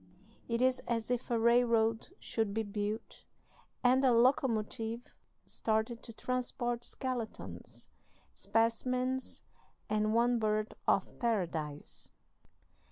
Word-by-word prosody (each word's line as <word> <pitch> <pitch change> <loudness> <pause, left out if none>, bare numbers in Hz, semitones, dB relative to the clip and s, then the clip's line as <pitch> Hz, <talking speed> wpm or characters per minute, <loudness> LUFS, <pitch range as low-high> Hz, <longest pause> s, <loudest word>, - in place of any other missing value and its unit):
It 235 +1 +1
is 260 0 +3
as 230 0 -1
if 245 +1 -1
a 235 - +2
railroad 230 -1 +3
should 220 -3 -1
be 225 - +1
built 210 +1 -4 0.6
and 255 +2 +5
a 260 - +6
locomotive 230 -2 +2 0.4
started 220 +1 -1
to - - -9
transport 240 0 -2
skeletons, 250 -4 -5 0.5
specimens, 250 +4 0 0.5
and 215 +1 +2
one 240 +1 +4
bird 215 0 0
of - - +1
Paradise." 165 -10 -2
230 Hz, 100 wpm, -33 LUFS, 220-245 Hz, 0.6 s, a